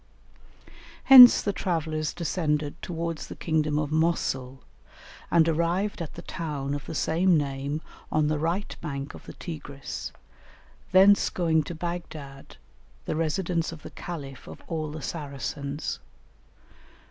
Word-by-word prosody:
Hence 250 -2 +10
the 200 - 0
travellers 160 -4 -2
descended 150 -4 -1
towards 165 -2 -4
the - - -8
kingdom 155 -2 0
of 150 -1 -1
Mosul, 135 -5 0 0.7
and 165 -1 +4
arrived 170 +5 0
at 165 - -6
the - - -9
town 145 -5 -4
of 145 0 -5
the 160 - -5
same 170 +3 +3
name 140 +1 -2 0.3
on 155 0 +2
the 155 0 0
right 170 +6 -2
bank 140 -3 -5
of - - -13
the - - -8
Tigris, 145 -4 -7 0.8
thence 195 +2 +6
going 165 -3 +1
to 170 - -6
Baghdad, 160 -5 -7 0.5
the - - -2
residence 165 +1 -1
of 165 -3 -11
the - - -9
Caliph 140 -7 -8
of - - -11
all 155 -2 -3
the 150 -1 -7
Saracens. 140 -1 -4
160 Hz, 135 wpm, -27 LUFS, 145-170 Hz, 0.8 s, Hence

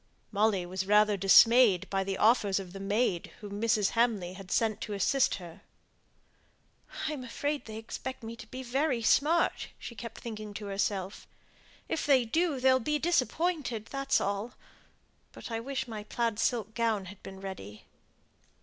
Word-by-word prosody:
Molly 205 -3 +2
was 190 +2 -4
rather 210 0 +5
dismayed 195 0 +6
by 195 -1 +1
the 195 0 -3
offers 210 -3 +3
of 185 -2 -8
the 195 - -7
maid 195 -2 0
whom 205 0 -7
Mrs. 220 -3 +2
Hamley 220 -7 +1
had 190 -1 -11
sent 220 0 +1
to 210 - -4
assist 245 +7 +2
her. 175 -3 -11 1.5
"I 310 - -2
am 270 -4 -6
afraid 285 +4 -3
they 220 -1 -7
expect 245 +3 -6
me 225 +1 -6
to 220 - -11
be 260 +3 -7
very 260 -1 0
smart," 315 +8 +2
she - - -8
kept 230 0 -8
thinking 215 -3 -7
to 210 - -6
herself. 195 -1 -2 0.6
"If 315 - -2
they 265 -4 +5
do, 315 +3 0
they'll 260 0 +4
be 300 +5 0
disappointed; 300 -6 0
that's 275 0 +1
all. 200 +4 -2 0.8
But - - -9
I 225 - -1
wish 265 +2 -4
my 215 -3 -6
plaid 230 0 -2
silk 230 -3 0
gown 225 -4 0
had 200 +2 -11
been 190 0 -10
ready." 185 - -8
220 Hz, 165 wpm, -30 LUFS, 200-255 Hz, 1.5 s, dismayed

